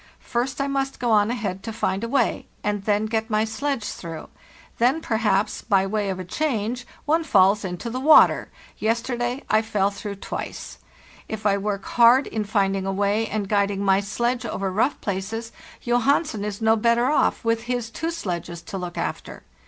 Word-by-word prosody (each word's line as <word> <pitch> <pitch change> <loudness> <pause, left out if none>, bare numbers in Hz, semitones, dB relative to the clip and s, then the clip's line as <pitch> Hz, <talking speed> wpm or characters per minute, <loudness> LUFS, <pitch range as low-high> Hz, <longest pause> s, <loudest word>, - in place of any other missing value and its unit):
First 250 +2 -2
I 275 - +1
must 275 -1 -2
go 240 -2 0
on 210 0 +4
ahead 205 -6 -3
to 225 - -5
find 200 -2 -1
a - - -1
way, 260 -2 +1 0.2
and 205 -1 -2
then 210 0 +2
get 220 +1 -1
my 215 0 +2
sledge 260 +3 -2
through; 165 -5 -7 0.5
then, 250 +7 +3
perhaps, 215 -6 0
by 195 -3 +2
way 205 0 -1
of 190 - -2
a 185 - -5
change, 245 - -2 0.2
one 320 +2 +2
falls 200 - +4
into 180 +4 -5
the 245 +2 -3
water; 300 +4 +6 0.3
yesterday, 240 +3 -1
I 215 - +3
fell 205 -3 0
through 200 0 -6
twice. 195 - -6 0.5
If 215 -1 -5
I 200 -1 +3
work 200 -1 -3
hard 240 +3 +5
in 215 -2 -3
finding 195 -2 0
a - - 0
way 205 +3 +1
and 205 -1 -2
eulding 200 -1 +1
my 195 -1 +3
sledge 235 +5 -1
over 195 -4 -3
rough 225 +9 +1
places, 215 +4 -4 0.3
Johansen 245 0 +1
is 210 +1 -4
no 220 0 +5
better 235 +2 +2
off, 300 - +1
with 230 0 +1
his 240 -2 -2
two 325 +7 -3
sledges 175 - -4
to 190 +3 -6
look 180 -1 -6
after. - - -4
220 Hz, 185 wpm, -24 LUFS, 200-240 Hz, 0.5 s, water